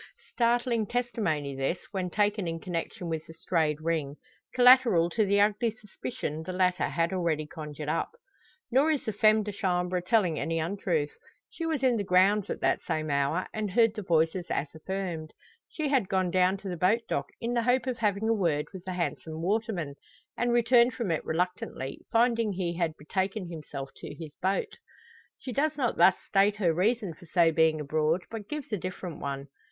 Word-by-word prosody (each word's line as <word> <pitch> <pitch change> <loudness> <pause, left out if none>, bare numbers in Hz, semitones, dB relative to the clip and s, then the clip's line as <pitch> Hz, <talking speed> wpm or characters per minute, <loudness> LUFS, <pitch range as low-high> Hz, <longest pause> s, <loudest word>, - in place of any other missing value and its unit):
Startling 235 -2 +1
testimony 200 - -1
this, 135 +6 -1
when 190 -2 -2
taken 205 -1 +1
in 165 0 -3
connection 175 0 -4
with 160 -1 -3
the 160 - -12
strayed 160 -3 0
ring: 155 -3 -1 0.4
collateral 245 -9 +6
to 220 - +2
the 200 +1 +3
ugly 210 +3 +3
suspicion 210 -7 -6
the 160 - -5
latter 185 0 +2
had 170 +1 0
already 165 -4 0
conjured 150 -1 -7
up. 165 - 0 0.6
Nor 270 +6 +4
is 300 -4 0
the 220 - -2
femme 215 +1 +4
de 210 - -4
chambre 180 -2 0
telling 180 -4 +2
any 165 0 -1
untruth. 165 -3 -1 0.4
She 330 - -4
was 310 -4 -1
in 250 -3 +4
the 205 - -1
grounds 190 +2 +3
at - - -4
that - - +2
same 155 -1 -2
hour, 140 +6 +1
and 215 -1 -2
heard 225 +2 +4
the 215 - -5
voices 170 0 +1
as 145 - -2
affirmed. 165 -1 -4 0.4
She 310 -3 -2
had 260 -9 +2
gone 185 -2 +1
down 185 +1 +3
to 195 - -9
the 180 -2 -3
boat 195 +8 +3
dock - - -1
in 235 +1 -2
the 240 - +2
hope 250 +2 +2
of 250 -2 -3
having 210 -1 +1
a 225 - +4
word 165 -8 0
with 185 -2 -8
the 185 - -3
handsome 165 -2 -3
waterman; 195 -6 -1 0.4
and 240 0 0
returned 240 0 +4
from 225 -8 -2
it 160 - -1
reluctantly, 170 -5 -3
finding 230 -2 +2
he 175 -2 -2
had 165 -2 -1
betaken 190 +4 -2
himself 145 -4 -7
to - - -8
his 160 -3 -8
boat. 190 +2 0 0.6
She 255 - -7
does 300 +3 0
not 250 -5 0
thus 175 +3 +6
state 200 +1 +3
her 180 -6 +2
reason 200 +1 +1
for 170 +2 -16
so 165 0 +4
being 160 -1 +3
abroad, 155 +4 0
but 220 -3 -7
gives 300 -6 -5
a - - +2
different 180 -2 -6
one. 140 0 -5
185 Hz, 190 wpm, -28 LUFS, 165-220 Hz, 0.6 s, collateral